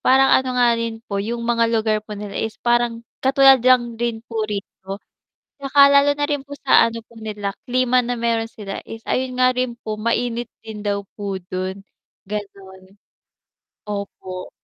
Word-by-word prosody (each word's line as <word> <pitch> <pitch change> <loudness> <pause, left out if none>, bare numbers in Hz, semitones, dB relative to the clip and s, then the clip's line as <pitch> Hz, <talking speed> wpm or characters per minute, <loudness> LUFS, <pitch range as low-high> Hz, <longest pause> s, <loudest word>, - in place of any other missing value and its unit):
parang 265 +1 +5
ano 255 -1 +2
nga 245 -1 +5
rin 230 0 -4
po 200 -1 -2
'yong 235 +3 -3
mga 230 -1 +2
lugar 220 -2 +1
po 210 -1 -8
nila 205 -1 -7
is 220 0 -3
parang 240 -1 +1 0.2
katulad 270 -1 +6
lang 245 -1 +4
rin 235 -1 -2
po 225 -2 -4
rito, 195 -1 -6 0.6
'saka 280 +1 0
lalo 280 +1 +6
na 290 - -2
rin 290 -1 0
po 285 - -7
sa 275 -4 +5
ano 230 -1 -6
po 225 0 -16
nila, 210 -2 -4 0.2
klima 255 0 +3
na 245 0 -1
meron 230 -1 0
sila 205 -3 -7
is 225 0 -8
ayon 255 0 -1
nga 255 0 +4
rin 250 -1 -2
po, 215 0 -4
mainit 235 +1 -1 0.2
din 220 -1 -8
daw 205 -1 -2 0.2
po 200 -1 -3 0.2
do'n, 185 +1 -3 0.4
gano'n. 195 -2 -8 0.9
Opo. 200 -3 -6
230 Hz, 170 wpm, -21 LUFS, 205-250 Hz, 0.9 s, katulad